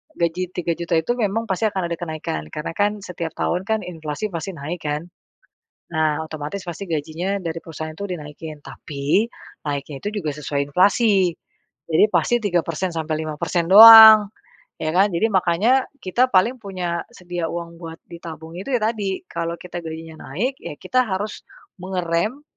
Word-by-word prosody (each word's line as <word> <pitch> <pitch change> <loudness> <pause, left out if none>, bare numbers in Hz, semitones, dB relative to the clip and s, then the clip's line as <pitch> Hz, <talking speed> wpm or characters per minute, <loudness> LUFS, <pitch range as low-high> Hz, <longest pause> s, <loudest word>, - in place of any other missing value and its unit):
gaji 175 +2 -1
3.000.000 170 0 -2
itu 160 - -2
memang 220 -1 0
pasti 190 +4 0
akan 190 -4 -2
ada 170 - -2
kenaikan 155 - -4
karena 150 - -4
kan 205 +1 +1
setiap 170 -4 -5
tahun 180 +1 -1
kan 220 0 +1
inflasi 160 +2 -5
pasti 170 +4 -4
naik 160 +4 -6
kan. 150 +2 -3 0.9
Nah 155 -1 +1
otomatis 155 +5 -6
pasti 175 +3 -6
gajinya 165 +5 -2
dari 165 -1 -3
perusahaan 160 -1 -7
itu 200 +4 -5
dinaikin 155 -3 -7
tapi 145 +9 -1 0.4
naiknya 140 0 -4
itu 205 - -2
juga 155 - -2
sesuai 145 -1 -2
inflasi 195 - +3 0.5
jadi 160 +5 +5
pasti 240 - +2
3% 180 -3 -1
sampai 160 -1 -2
5% 165 +2 -2
doang 220 0 +11 0.5
ya 155 - -1
kan 190 +4 +4
jadi 170 +6 +2
makanya 195 +8 +3 0.2
kita 240 +8 +2
paling 230 +8 +3
punya 180 -4 -3
sedia 175 -3 -4
uang 170 0 -6
buat 165 -1 -8
ditabung 165 -1 -9
itu 195 - -8
ya 245 - +2
tadi 210 -4 -1
kalau 170 0 -3
kita 175 0 -7
gajinya 160 0 -8
naik 250 - -1
ya - - -7
kita 255 - 0
harus 205 +1 -3 0.4
mengerem 185 +7 -2
175 Hz, 155 wpm, -22 LUFS, 160-200 Hz, 0.9 s, doang